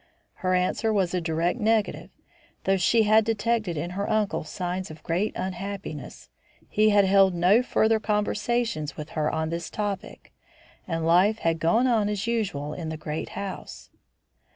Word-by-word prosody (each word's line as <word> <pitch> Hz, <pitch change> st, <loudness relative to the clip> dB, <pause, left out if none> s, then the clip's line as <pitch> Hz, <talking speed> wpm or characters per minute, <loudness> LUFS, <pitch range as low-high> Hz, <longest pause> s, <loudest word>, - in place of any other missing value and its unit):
Her 185 Hz, 0 st, +2 dB
answer 185 Hz, +5 st, +1 dB
was 190 Hz, -4 st, +1 dB
a 180 Hz, -, 0 dB
direct 165 Hz, +6 st, -1 dB
negative. 220 Hz, -1 st, 0 dB, 0.5 s
Though 195 Hz, 0 st, +2 dB
she 220 Hz, +5 st, +3 dB
had 215 Hz, +1 st, +5 dB
detected 220 Hz, -4 st, 0 dB
in 170 Hz, +4 st, -3 dB
her 200 Hz, +3 st, -3 dB
uncle 215 Hz, -2 st, 0 dB
signs 185 Hz, 0 st, -4 dB
of 155 Hz, 0 st, -11 dB
great 180 Hz, +6 st, 0 dB
unhappiness, 190 Hz, -4 st, -6 dB, 0.4 s
he 215 Hz, +1 st, +3 dB
had 205 Hz, -1 st, +5 dB
held 190 Hz, -1 st, +4 dB
no 180 Hz, +7 st, +4 dB
further 225 Hz, -3 st, +2 dB
conversation 210 Hz, -3 st, -1 dB
with 150 Hz, 0 st, -6 dB
her 150 Hz, -1 st, -1 dB
on 160 Hz, 0 st, -2 dB
this 170 Hz, 0 st, -4 dB
topic, 205 Hz, -2 st, -5 dB, 0.5 s
and 165 Hz, -2 st, -2 dB
life 185 Hz, +6 st, +4 dB
had 165 Hz, -5 st, 0 dB
gone 170 Hz, +10 st, +3 dB
on 225 Hz, -5 st, +2 dB
as 210 Hz, 0 st, -2 dB
usual 190 Hz, -11 st, -2 dB
in 160 Hz, -1 st, -5 dB
the 160 Hz, -, -4 dB
great 155 Hz, 0 st, -5 dB
house. 195 Hz, -2 st, -7 dB
195 Hz, 160 wpm, -26 LUFS, 170-215 Hz, 0.5 s, had